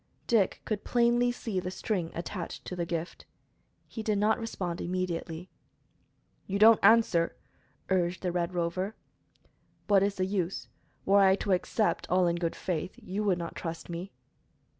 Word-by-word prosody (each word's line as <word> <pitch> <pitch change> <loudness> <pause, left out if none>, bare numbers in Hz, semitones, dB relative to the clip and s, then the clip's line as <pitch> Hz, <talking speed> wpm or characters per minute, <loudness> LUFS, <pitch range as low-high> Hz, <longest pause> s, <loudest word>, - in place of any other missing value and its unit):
Dick 215 -6 +2
could 210 -2 -2
plainly 240 0 +3
see 225 -5 -3
the 180 - -4
string 185 -3 -2
attached 175 +1 -5
to 180 - -5
the 170 -1 -2
gift. 170 0 -5 0.6
He 225 - -6
did 215 -1 0
not 210 +3 +2
respond 180 -6 -4
immediately. 175 -1 -3 1.0
"You 200 - -1
don't 220 +2 +7
answer," 200 -6 +4 0.5
urged 180 -1 0
the 180 - 0
Red 175 +1 -2
Rover. 185 +5 -1 0.9
"What 200 -2 +4
is 200 0 +1
the 185 - 0
use? 190 -2 -2 0.4
Were 200 +1 +5
I 190 -1 +6
to 200 - -3
accept, 185 0 0
all 180 0 +3
in 170 0 +1
good 170 -1 -2
faith, 180 0 -3
you 200 +3 -3
would 190 -3 +2
not 170 -1 -5
trust 165 0 -6
me." 175 +3 -5
185 Hz, 160 wpm, -29 LUFS, 175-205 Hz, 1.0 s, don't